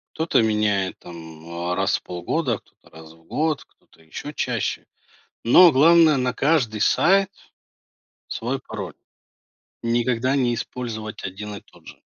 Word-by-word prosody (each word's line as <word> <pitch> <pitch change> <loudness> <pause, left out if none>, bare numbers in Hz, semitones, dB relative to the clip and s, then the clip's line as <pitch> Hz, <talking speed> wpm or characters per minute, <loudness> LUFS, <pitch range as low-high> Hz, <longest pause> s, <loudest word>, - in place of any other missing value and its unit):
Кто-то 160 -4 +2
меняет 105 -3 0
там, 80 -2 -11
э, 85 +1 -4
раз - - +1
в - - -24
полгода, 115 - -2
кто-то- - - -27
раз 80 0 -12
в 80 0 -23
год, 155 - -1
кто-то- - - -29
ещё 80 - -8
чаще. 125 -7 -2 0.6
Но 170 +9 +7
главное- 160 +2 +6
на 125 0 0
каждый 125 -7 +1
сайт 195 - +3 1.0
свой 125 +4 -3
пароль, 100 - -7 0.9
никогда 120 +2 0
не 125 -3 +1
использовать 110 -4 -6
1 105 +2 -6
и 100 - -8
тот - - -23
же. - - -13
115 Hz, 140 wpm, -23 LUFS, 95-140 Hz, 1.0 s, Но